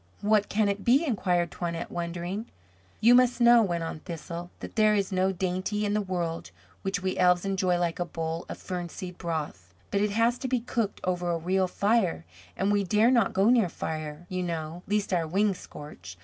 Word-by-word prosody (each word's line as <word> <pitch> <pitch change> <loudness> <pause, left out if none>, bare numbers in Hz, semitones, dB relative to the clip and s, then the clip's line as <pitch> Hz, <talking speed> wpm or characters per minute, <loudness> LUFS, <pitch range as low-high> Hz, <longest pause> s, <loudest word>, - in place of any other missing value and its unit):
"What 210 0 +2
can 215 0 +2
it 200 0 -2
be?" 270 +7 +4
inquired 180 - 0
Toinette, 170 -1 -4
wondering. 175 +5 -4 0.5
"You 235 +3 +7
must 250 0 +4
know," 240 0 +7
went 175 -5 -1
on 165 -1 -5
Thistle, 170 +1 -7
"that - - -8
there 215 -1 +4
is 200 -1 0
no 190 0 +2
dainty 185 +3 -2
in 205 - 0
the 210 - +1
world 175 -4 -3 0.3
which 195 -1 -2
we 185 0 -1
elves 180 0 +4
enjoy 185 -2 +1
like 175 -1 -1
a 175 - 0
bowl 165 0 -4
of - - -5
fern 180 -2 -5
seed 180 0 -8
broth. 145 - -5 0.2
But 200 - +1
it 210 - +2
has 230 +4 +2
to 265 - -3
be 255 -1 +1
cooked 230 -3 -2
over 180 -1 -1
a 170 - +1
real 185 +3 +1
fire, 200 - +1 0.3
and 195 +2 +1
we 205 -1 +2
dare 215 +5 +3
not 235 -6 +3
go 195 +5 +4
near 230 -7 +4
fire, 155 0 -5
you 185 0 -3
know, 165 -1 -4
lest 205 -1 0
our 170 -3 +1
wings 195 +3 +1
scorch. 145 - -10
185 Hz, 205 wpm, -27 LUFS, 170-210 Hz, 0.5 s, You